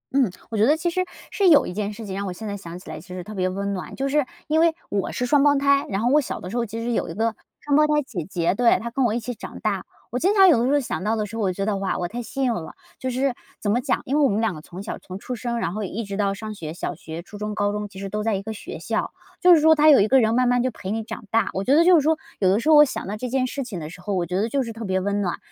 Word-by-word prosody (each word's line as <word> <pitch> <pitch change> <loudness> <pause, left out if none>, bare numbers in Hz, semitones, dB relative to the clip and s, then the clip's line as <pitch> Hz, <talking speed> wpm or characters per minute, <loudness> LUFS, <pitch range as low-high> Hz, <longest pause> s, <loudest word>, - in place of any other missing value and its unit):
嗯。 265 -5 +3 0.2
我 225 - -3
觉 210 - +4
得 295 +5 +4
其 345 +2 0
实， 370 +2 0 0.3
是 395 - +2
有 295 -4 +6
一 - - -5
件 205 +1 -2
事 220 +2 -8
情 190 -2 -5
让 200 +1 -3
我 185 - -4
现 215 +5 -7
在 200 - -3
想 175 -3 -8
起 - - -13
来 - - -6
其 - - -16
实 180 0 -6
特 215 - -9
别 185 -2 0
温 200 +2 -3
暖。 185 - -6
就 270 - -1
是 295 0 +2 0.2
因 310 +1 +2
为 330 0 +4 0.2
我 200 -2 -1
是 250 - -2
双 280 +2 +4
胞 290 -1 +5
胎， 280 0 +3
然 195 +1 -1
后 240 - +2
我 295 - +6
小 265 - -5
的 180 - -7
时 235 - -4
候 235 - +1
其 225 +1 -6
实 240 +1 -2
有 230 - -1
一 - - -5
个 225 +1 0 0.2
双 290 -1 0
胞 305 - +6
胎 300 0 +2
姐 180 - -5
姐， 175 -2 +1
对， 240 +2 +4
她 235 - -5
跟 265 +1 +1
我 225 - +1
一 235 - 0
起 245 +2 -5
长 - - -9
大。 200 -3 -1 0.3
我 250 - -1
经 385 +7 +2
常 385 -2 +8
有 285 -9 +5
的 235 - +1
时 275 - +2
候 - - +5
想 220 -6 -4
到 220 +2 +1
的 215 -1 -1
时 215 +2 -7
候， - - -2
我 190 -3 +1
觉 195 +2 -2
得， 210 -1 0
哇， 195 0 -1
我 180 - -2
太 240 +4 -4
幸 270 +3 -4
运 250 - +2
了。 160 -7 -6 0.3
就 260 - -2
是， 260 +1 0 0.3
怎 205 - 0
么 235 - +2
讲， 260 +1 0
因 275 +3 0
为 - - +3
我 285 - +5
们 210 -2 0
两 225 -4 +1
个 155 - -8
从 180 +5 -9
小 - - -5
从 185 - -8
出 250 +5 -5
生 235 +1 -3
然 175 -6 -2
后 215 +1 -3
一 210 +5 -4
直 200 -1 -5
到 200 -1 +1
上 215 +1 -6
学， 160 -6 -7
小 175 - -4
学、 160 +2 -8
初 205 - -11
中、 210 0 -4
高 205 -1 +1
中 210 0 -3
其 195 -1 -14
实 195 0 -5
都 210 +2 -2
在 220 -1 0
一 195 - -2
个 220 - -5
学 300 - -7
校。 - - -2 0.3
就 360 -1 +7
是 310 - +3
说 320 +1 +7
她 305 0 +5
有 285 - +7
一 205 - +3
个 265 - +6
人 225 -1 +2
慢 250 0 +3
慢 245 0 +3
就 255 - +1
陪 195 -5 -6
你 225 +1 -1
长 220 - -7
大， 225 0 +2
我 190 - -2
觉 260 - +2
得 325 +3 +5
就 365 0 +7
是 320 - +5
说， 315 +2 +3 0.2
有 190 - +3
的 195 +3 +3
时 235 - -4
候 315 - +8
我 295 - +10
想 275 - -3
到 205 - -3
这 250 +4 -4
件 255 +1 +1
事 275 +2 -4
情 220 -8 -6
的 155 -1 -6
时 180 +2 -12
候， 200 +2 -3
我 180 -2 0
觉 180 +2 -4
得 210 +5 +1
就 275 +3 0
是 230 -2 -6
特 225 +1 -7
别 190 -2 0
温 200 +2 -1
暖。 180 -3 -1
220 Hz, 380 characters per minute, -23 LUFS, 195-270 Hz, 0.3 s, 我